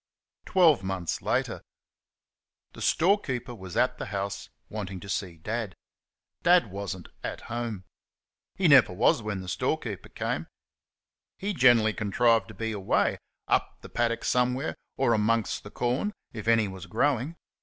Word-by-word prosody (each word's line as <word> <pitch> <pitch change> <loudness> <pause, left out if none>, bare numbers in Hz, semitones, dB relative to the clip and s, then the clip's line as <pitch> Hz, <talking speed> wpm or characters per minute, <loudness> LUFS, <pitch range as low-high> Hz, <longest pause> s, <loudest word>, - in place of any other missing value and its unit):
Twelve 170 - +5
months 95 -3 -2
later. - - -1 1.1
The - - -11
storekeeper 155 - +1
was 95 -5 -8
at 125 0 +2
the - - -4
house 100 -1 -4 0.2
wanting 100 -3 -5
to - - -9
see 95 -4 -3
Dad. 105 +2 -4 0.7
Dad 175 - +4
was 100 0 -4
n't 85 - -13
at - - -4
home. 115 -4 -4 0.7
He 190 - +2
never 135 - +7
was 100 +4 +3
when 105 -3 -3
the 95 - -9
storekeeper 90 - -2
came; - - -3 0.9
he 205 +2 -2
generally 120 - +5
contrived 110 0 +2
to 110 - -11
be 110 +2 -2
away, 100 -3 +1 0.3
up - - +1
the - - -11
paddock 115 -1 0
somewhere 125 +3 +1 0.2
or 130 -3 +3
amongst 110 0 +1
the 105 - -9
corn 125 - -1 0.2
if 110 -2 -7
any 115 -2 +4
was 95 -1 -8
growing. 140 - 0
115 Hz, 145 wpm, -28 LUFS, 100-125 Hz, 1.1 s, never